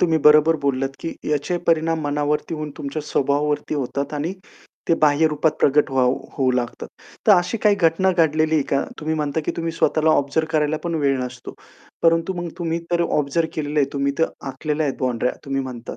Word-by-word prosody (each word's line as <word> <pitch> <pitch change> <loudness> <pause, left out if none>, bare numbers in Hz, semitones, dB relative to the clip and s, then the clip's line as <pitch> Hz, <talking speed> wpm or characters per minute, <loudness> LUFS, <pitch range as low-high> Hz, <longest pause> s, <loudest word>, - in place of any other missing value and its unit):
तुम्ही 165 -2 +3
बरोबर 155 +2 +6
बोललात, 135 -1 0
की 165 - -5 0.2
याचे 150 +4 0
परिणाम 165 0 +2
मनावरती 150 +2 -1
होऊन 155 -1 -5
तुमच्या 145 +2 -4
स्वभावावरती 145 +1 0
होतात 140 +1 -3
आणि 150 +5 -2 0.6
ते 165 - +5
बाह्य 150 +1 +4
रूपात 150 +1 +1
प्रकट 145 +1 +3
होऊ 130 -1 +2 0.2
होऊ 130 -2 +1
लागतात. 125 -1 -3 0.4
तर 215 - +8
अशी 180 +4 +2
काही 210 -1 +6
घटना 180 +1 +2
घडलेली 160 -2 +2
आहे 150 - +3
का? 140 - +2 0.2
तुम्ही 155 +1 -1
म्हणता, 150 0 -1
की - - 0
तुम्ही 165 -1 -2
स्वतःला 160 -1 +2
ऑब्झर्व 155 +2 +1
करायला 155 0 +1
पण 170 -1 -2
वेळ 140 -2 +2
नसतो. 125 0 -9 0.5
परंतु 165 +2 +3
मग 175 -1 -4
तुम्ही 165 -1 -1
तर 170 0 +2 0.2
ऑब्झर्व 150 +3 0
केलेलं 150 -1 -2
आहे, 135 - +2
तुम्ही 140 0 0
तर 165 - +3 0.2
आखलेल्या 150 +3 -2
आहेत 135 - -2
बाउंडऱ्या 125 -1 0
तुम्ही 135 0 -1
म्हणतात. 125 -3 -7
150 Hz, 190 wpm, -21 LUFS, 140-165 Hz, 0.6 s, तर